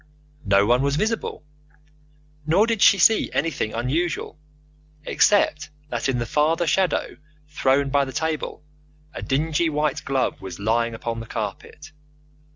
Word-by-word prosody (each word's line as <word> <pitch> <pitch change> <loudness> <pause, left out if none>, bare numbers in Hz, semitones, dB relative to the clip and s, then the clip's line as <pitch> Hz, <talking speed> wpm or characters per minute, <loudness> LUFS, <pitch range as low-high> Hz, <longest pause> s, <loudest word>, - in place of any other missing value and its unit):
No 100 0 +4
one 120 +3 +3
was 140 0 0
visible, 215 -1 -2 1.0
nor 185 +7 +4
did 225 -3 -1
she 200 - +7
see 215 +4 +4
anything 145 -9 -1
unusual, 150 +6 -2 0.7
except 205 -6 +2 0.2
that 120 +1 -2
in 130 - 0
the 120 - -2
farther 155 +7 +1
shadow 185 +3 0 0.3
thrown 135 -2 +1
by 140 0 +2
the 130 - -7
table 155 +2 -3 0.5
a - - -7
dingy 155 +4 0
white 150 -2 -1
glove 135 -6 -1
was 95 -3 -7
lying 115 +3 0
upon 115 0 -4
the 115 - -8
carpet. 110 +9 -6
140 Hz, 140 wpm, -23 LUFS, 120-160 Hz, 1.0 s, she